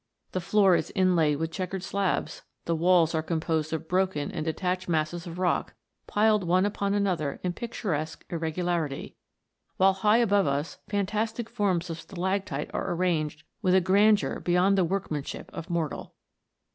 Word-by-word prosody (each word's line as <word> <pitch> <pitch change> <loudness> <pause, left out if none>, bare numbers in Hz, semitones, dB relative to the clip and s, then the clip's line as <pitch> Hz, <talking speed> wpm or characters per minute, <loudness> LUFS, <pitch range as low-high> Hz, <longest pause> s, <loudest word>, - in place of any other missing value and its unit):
The 185 - -2
floor 195 0 +4
is - - -1
inlaid 175 -6 +3
with 160 +2 -2
chequered 185 +1 -4
slabs; 195 -1 -1 0.2
the 165 - 0
walls 170 0 +4
are 160 - +1
composed 160 -1 -1
of 160 0 -3
broken 185 -5 0
and 160 - -3
detached 180 +3 -2
masses 165 +2 -1
of 170 0 -7
rock, 180 -1 0 0.3
piled 210 -1 +3
one 180 +2 +3
upon 200 -1 -1
another 180 -8 0
in 180 -1 -1
pictu 235 +1 -6
resque 155 0 -2
irregularity; 165 -3 -2 0.6
while 190 +1 +5
high 210 +3 +3
above 205 -6 +3
us 140 +3 -2
fantastic 215 +3 -1
forms 185 -7 0
of 165 - -5
stalactite 190 -5 -3
are - - -2
arranged 160 -4 -1 0.2
with 185 -3 +3
a - - +7
grandeur 200 +3 +3
beyond 180 +3 +3
the 190 - +3
workmanship 165 -5 -3
of 165 - -7
mortal. 170 -3 -3
180 Hz, 160 wpm, -27 LUFS, 160-195 Hz, 0.6 s, a